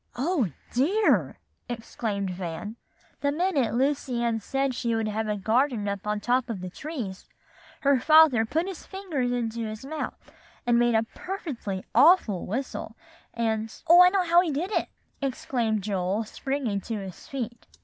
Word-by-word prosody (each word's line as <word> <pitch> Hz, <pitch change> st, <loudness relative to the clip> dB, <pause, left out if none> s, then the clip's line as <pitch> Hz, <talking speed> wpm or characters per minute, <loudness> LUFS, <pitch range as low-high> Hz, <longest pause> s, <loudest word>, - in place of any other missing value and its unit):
'" -, -, -31 dB
"Oh, 330 Hz, -, +2 dB, 0.3 s
dear!" 370 Hz, -, +2 dB, 0.3 s
exclaimed 220 Hz, -4 st, -3 dB
Van. 180 Hz, +4 st, -5 dB, 0.4 s
"The 285 Hz, -, +1 dB
minute 300 Hz, -8 st, +1 dB
Lucy 260 Hz, -2 st, 0 dB
Ann 230 Hz, -1 st, +1 dB
said 270 Hz, +4 st, -1 dB
she 235 Hz, -2 st, -1 dB
would 225 Hz, -1 st, 0 dB
have 215 Hz, +1 st, -2 dB
a 210 Hz, -1 st, -1 dB
garden 225 Hz, +2 st, +1 dB
up 200 Hz, 0 st, -3 dB
on 210 Hz, 0 st, 0 dB
top 245 Hz, +3 st, +1 dB
of 220 Hz, -5 st, -3 dB
the 180 Hz, 0 st, -6 dB
trees, 240 Hz, -, -6 dB, 0.5 s
her 280 Hz, -3 st, +4 dB
father 310 Hz, -4 st, +6 dB
put 320 Hz, +10 st, 0 dB
his 380 Hz, -3 st, -7 dB
fingers 330 Hz, -11 st, -3 dB
in 240 Hz, -2 st, -1 dB
his 220 Hz, 0 st, -5 dB
mouth, 305 Hz, +2 st, -4 dB, 0.5 s
and 240 Hz, -1 st, +4 dB
made 240 Hz, -1 st, +3 dB
a 220 Hz, -, +4 dB
perfectly 255 Hz, -, -5 dB
awful 290 Hz, -, +5 dB
whistle, 255 Hz, +7 st, -4 dB, 0.4 s
and" 225 Hz, -1 st, -2 dB
"Oh, 345 Hz, +2 st, +9 dB
I 360 Hz, -, +9 dB
know 380 Hz, 0 st, +2 dB
how 345 Hz, +1 st, +6 dB
he 355 Hz, -, -1 dB
did 320 Hz, +7 st, -2 dB
it!" -, -, 0 dB, 0.3 s
exclaimed 240 Hz, -5 st, -1 dB
Joel, 195 Hz, +1 st, -1 dB
springing 240 Hz, -2 st, -2 dB
to 225 Hz, -, -4 dB
his 195 Hz, -3 st, -8 dB
feet. 240 Hz, -3 st, -5 dB
240 Hz, 165 wpm, -27 LUFS, 215-290 Hz, 0.5 s, Oh